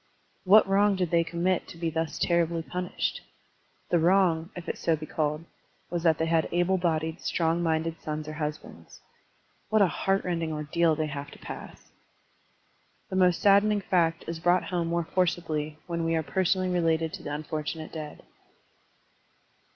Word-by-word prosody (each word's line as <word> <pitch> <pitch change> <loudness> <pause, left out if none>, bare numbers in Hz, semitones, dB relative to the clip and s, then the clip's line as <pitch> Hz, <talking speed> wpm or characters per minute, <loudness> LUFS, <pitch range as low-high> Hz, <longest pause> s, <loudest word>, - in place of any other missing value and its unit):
What 205 +3 +7
wrong 200 +1 +3
did 180 -3 -1
they 170 -1 +4
commit 175 +2 -1
to - - -11
be 165 -1 -2
thus 160 0 -2
terribly 170 -1 +1
punished? 180 +2 -3 0.7
The 175 - +4
wrong, 170 -1 +3
if 180 - -8
it - - +1
be - - -15
so 165 -2 +1
called, 155 0 -2 0.5
was 175 -1 -1
that 165 -2 +3
they 160 - 0
had 165 -1 +1
able 175 +2 +2
bodied, 160 -1 -1
strong 165 0 0
minded 165 0 -1
sons 155 0 -4
or 155 - -5
husbands. 150 -1 -6 0.7
What 215 -1 +4
a - - +6
heart 195 +2 0
rending 165 -3 -2
ordeal 155 +2 +1
they 155 0 -1
have 145 -1 -6
to - - -13
pass! - - -10 1.2
This 190 - +1
most 180 -2 +3
saddening 205 +1 +5
fact 170 -3 +1
is 165 0 -4
brought 175 +1 +3
home 175 -2 -2
more 170 0 0
forcibly 160 -4 -1
when 170 -1 -3
we 165 0 +1
are 160 - 0
personally 185 +5 +1
related 165 -2 +1
to - - -7
the - - -5
tmforttmate 155 +1 -4
dead. 155 -2 -8
165 Hz, 165 wpm, -27 LUFS, 160-180 Hz, 1.2 s, What